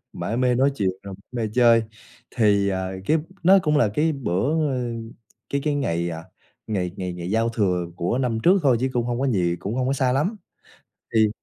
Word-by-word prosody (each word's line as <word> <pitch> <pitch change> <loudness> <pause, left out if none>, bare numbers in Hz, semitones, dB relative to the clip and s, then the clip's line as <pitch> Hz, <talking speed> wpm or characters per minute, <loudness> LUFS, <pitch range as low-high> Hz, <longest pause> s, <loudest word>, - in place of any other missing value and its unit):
mải 115 - -3
mê 125 0 +2
nói 135 +3 +3
chuyện 95 -5 +1
rồi 100 -1 -8 0.2
mê 115 -3 -2
chơi, 120 -2 +5 0.5
thì, 100 -4 +3
ờ, 95 -1 -2
cái 160 - +3 0.2
nó 190 +3 +7
cũng 150 -2 +2
là 120 -7 +4
cái 160 +4 +2
bữa, 140 - 0
ơ 130 -2 -2 0.7
cái 140 - 0
cái 150 -1 +1
ngày, 85 -11 -1
à, 80 0 -7 0.4
ngày 90 -5 -2
ngày 90 -1 -4
ngày 90 0 -6
giao 115 +2 +1
thừa 95 -6 0
của 90 +9 -1
năm 125 -4 0
trước 185 +3 +5
thôi 135 -4 +4
chứ 130 - +1
cũng 120 -2 0
hông 120 0 -2
có 135 - +1
gì, 90 -7 +1
cũng 100 +5 -5
hông 130 -1 0
có 135 - +1
xa 130 -2 +1
lắm. 155 - 0 0.8
Thì 110 -1 +5
120 Hz, 210 wpm, -23 LUFS, 95-135 Hz, 0.8 s, nó